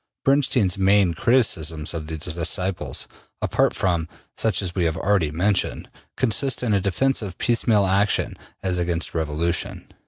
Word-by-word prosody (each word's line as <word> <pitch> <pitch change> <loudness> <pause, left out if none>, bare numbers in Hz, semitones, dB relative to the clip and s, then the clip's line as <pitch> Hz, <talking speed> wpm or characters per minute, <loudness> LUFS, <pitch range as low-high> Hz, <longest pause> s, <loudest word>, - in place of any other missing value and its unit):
Bernstein's 125 -9 +2
main 95 -2 +3
criticisms 80 - +1
of 80 -2 -6
these 80 0 -4 0.2
disciples, 90 +3 0 0.3
apart - - 0
from 85 -4 -1 0.2
such 110 -2 0
as 90 -2 -3
we 90 -2 0
have 80 0 -1
already 95 -6 +1
mentioned, 90 +6 -1 0.3
consist 130 +1 +2
in 115 -4 +1
a 100 - +2
defense 130 +9 0
of 95 -4 -7
piecemeal 115 -3 +2
action 100 +2 +1 0.3
as 90 -2 0
against 85 -1 -2
revolution. 80 +2 -2
95 Hz, 145 wpm, -22 LUFS, 85-105 Hz, 0.3 s, main